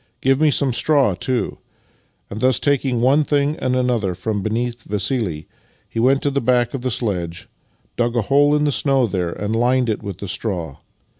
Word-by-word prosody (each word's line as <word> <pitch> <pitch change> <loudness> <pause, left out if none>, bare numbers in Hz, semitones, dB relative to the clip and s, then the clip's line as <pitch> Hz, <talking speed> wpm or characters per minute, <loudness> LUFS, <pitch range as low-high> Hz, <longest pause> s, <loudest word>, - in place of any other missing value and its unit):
Give 135 +2 +2
me 155 - +5
some 140 -3 +1
straw, 140 -4 +2
too," 125 +7 -2 0.7
and, 105 - -5
thus 130 +1 +3
taking 135 -4 0
one 140 +5 +4
thing 145 0 +1
and 130 0 -1
another 120 -7 0
from 105 +2 -3
beneath 120 +3 -2
Vassili, 100 - -2 0.4
he - - -5
went 135 +4 +3
to 145 - +1
the 140 0 0
back 120 0 +1
of 135 - -4
the 130 - -1
sledge, 90 -8 -3 0.5
dug 120 0 0
a 120 - +1
hole 145 +5 +3
in 150 - +1
the 150 - +2
snow 135 -2 +2
there, 90 -5 -2
and 105 +4 -3
lined 125 +1 +2
it 110 - -1
with 100 -1 -6
straw. 90 -7 -4
120 Hz, 190 wpm, -20 LUFS, 105-135 Hz, 0.7 s, me